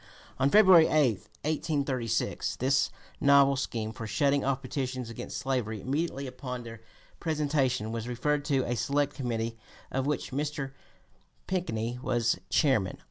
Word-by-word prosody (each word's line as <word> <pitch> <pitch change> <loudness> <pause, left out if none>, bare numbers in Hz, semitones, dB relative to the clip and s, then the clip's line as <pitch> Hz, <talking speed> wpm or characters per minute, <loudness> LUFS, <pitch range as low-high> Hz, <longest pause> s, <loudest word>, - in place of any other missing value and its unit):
On 135 +1 +4
February 185 -4 +7
8, 135 -9 +3 0.3
1836, 140 -7 -1
this 130 +1 +2 0.3
novel 140 -1 +5
scheme 115 -4 -3
for 115 0 -7
shutting 140 +7 +2
off 135 0 0
petitions 130 -2 -3
against 115 - -6
slavery 120 -5 -2
immediately 140 - -2
upon 125 -1 -6
their 115 -1 -9 0.4
presentation 140 -8 0
was 115 0 -4
referred 145 +4 0
to 135 -3 +1
a 120 - -1
select 145 +3 0
committee 115 -3 -3 0.3
of 135 +1 -1
which 150 -1 -2
Mr. 145 0 -3 0.7
Pinckney 120 -10 -2
was 120 -5 +1
chairman. 125 -11 +2
130 Hz, 135 wpm, -29 LUFS, 115-145 Hz, 0.7 s, February